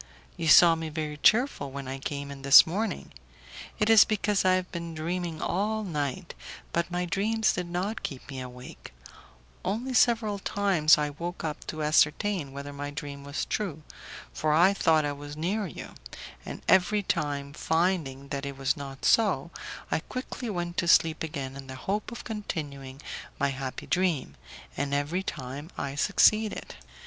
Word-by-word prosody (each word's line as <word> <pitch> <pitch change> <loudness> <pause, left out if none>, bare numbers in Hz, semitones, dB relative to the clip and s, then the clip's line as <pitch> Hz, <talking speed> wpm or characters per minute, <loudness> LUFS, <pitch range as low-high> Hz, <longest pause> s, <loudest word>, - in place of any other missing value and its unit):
You 165 - -3
saw 170 +2 +8
me 160 -1 -4
very 150 -1 -4
cheerful 220 - +3
when 135 0 -7
I 135 +1 -5
came 140 +1 -5
in 140 -1 -9
this 140 +1 +9
morning; 210 +7 -3 0.7
it 210 - +1
is 225 -2 +9
because 210 -1 0
I 185 0 +4
have 185 0 -3
been 170 -1 -5
dreaming 170 0 -3
all 215 +4 -1
night, 160 0 -3 0.4
but 170 0 0
my 180 0 -1
dreams 215 +4 +1
did 180 -1 -3
not 185 +6 -3
keep 135 -3 -6
me 135 -2 -6
awake; 125 - -10 0.7
only 230 +8 -2
several 220 -4 +3
times 190 -6 +3
I 150 -1 -1
woke 170 +4 -6
up 155 -2 -5
to 155 -1 -4
ascertain 155 +2 +2
whether 140 +1 -7
my 145 0 -5
dream 145 -1 -7
was 140 +1 -3
true, 170 -8 -3 0.5
for 150 - 0
I 175 +5 +5
thought 160 -5 +3
I 145 - -1
was 145 +1 -8
near 195 +6 -1
you; - - -9 0.5
and - - -7
every 190 +3 +4
time, 145 -5 -2
finding 160 -5 -1
that 140 0 -3
it 140 -1 -5
was 135 0 +1
not 135 -2 -7
so, 180 -9 +3 0.4
I - - +2
quickly 255 +4 -6
went 175 -3 -3
to 175 - 0
sleep 165 -1 +4
again 140 -4 -4
in 135 -1 -9
the 130 - -7
hope 200 - -3
of 235 - -7
continuing 145 - -6 0.4
my 140 - +2
happy 135 -1 -5
dream, 170 - 0 0.4
and 140 0 -1
every 150 +6 -1
time 140 -3 -6
I 140 - -3
succeeded. 210 +7 +2
160 Hz, 170 wpm, -28 LUFS, 140-190 Hz, 0.7 s, this